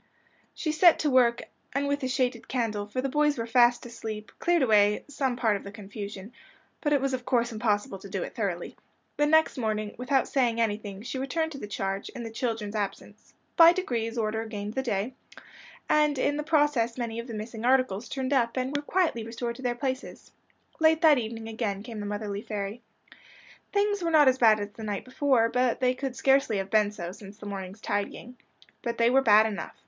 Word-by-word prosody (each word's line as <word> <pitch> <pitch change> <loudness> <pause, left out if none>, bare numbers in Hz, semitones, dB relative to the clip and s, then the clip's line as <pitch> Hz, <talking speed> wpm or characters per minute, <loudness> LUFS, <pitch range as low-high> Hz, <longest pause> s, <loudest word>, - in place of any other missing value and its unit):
She 310 - -2
set 325 +2 +6
to 300 - 0
work, 240 -2 +4 0.3
and 280 +1 0
with 285 0 -1
a 260 - -1
shaded 250 -2 -1
candle, 215 -5 -2
for 230 +5 -3
the 275 - -1
boys 295 +1 +2
were 230 - -2
fast 240 +1 +4
asleep, 220 -2 -7
cleared 345 -3 +2
away 210 -3 +3
some 275 -3 -1
part 225 -4 +1
of 200 - -5
the 200 - -8
confusion. 205 0 -8 0.5
But 295 - 0
it 290 - +4
was 270 0 -1
of 255 -1 -2
course 240 -1 +1
impossible 210 -3 -1
to 200 - -11
do 190 -1 -2
it - - -7
thoroughly. 190 -6 -3 0.4
The 295 - +3
next 315 -2 +3
morning, 215 -2 -2
without 265 +2 +1
saying 240 -4 +1
anything, 205 -2 -2
she 260 +2 -4
returned 320 +4 -1
to 275 - -7
the 210 - -6
charge, 195 -1 -3
in 240 - -5
the 225 - -6
children's 225 -3 -3
absence. 205 -2 -5 0.2
By 335 0 +8
degrees 235 -10 -2
order 220 0 -1
gained 210 -1 -5
the 265 - -1
day, 230 -1 -2 0.7
and 300 -2 +3
in 285 +3 +1
the 300 - -2
process 295 -7 +1
many 230 -2 -3
of 235 - -6
the 230 - -6
missing 220 +1 -6
articles 245 -4 +2
turned 265 0 -2
up, 240 -2 +1
and 260 +2 -2
were 290 - 0
quietly 315 -7 0
restored 235 +1 -4
to - - -10
their 245 -2 -1
places. 260 +1 -5 0.5
Late 320 0 +4
that 305 -5 +6
evening 225 -1 -5
again 220 -3 -3
came 225 -2 -7
the 205 - -4
motherly 205 -1 -4
fairy. 210 +1 -5 0.9
Things 410 -1 +1
were 340 - 0
not 305 -3 +6
as 260 0 +4
bad 220 -3 +6
as 205 0 -5
the 225 - -12
night 205 -2 -3
before 255 -3 +2 0.3
they 255 -1 +2
could 265 0 -4
scarcely 270 -4 +3
have 195 0 -4
been 215 -2 +4
so, 175 -4 -6
since 200 +1 -12
the 215 - -11
morning's 195 0 -6
tidying. 205 +5 -4 0.4
But 235 -1 -3
they 235 +1 +4
were 270 +1 +5
bad 215 -3 +6
enough. 205 -6 -4
235 Hz, 205 wpm, -27 LUFS, 210-270 Hz, 0.9 s, By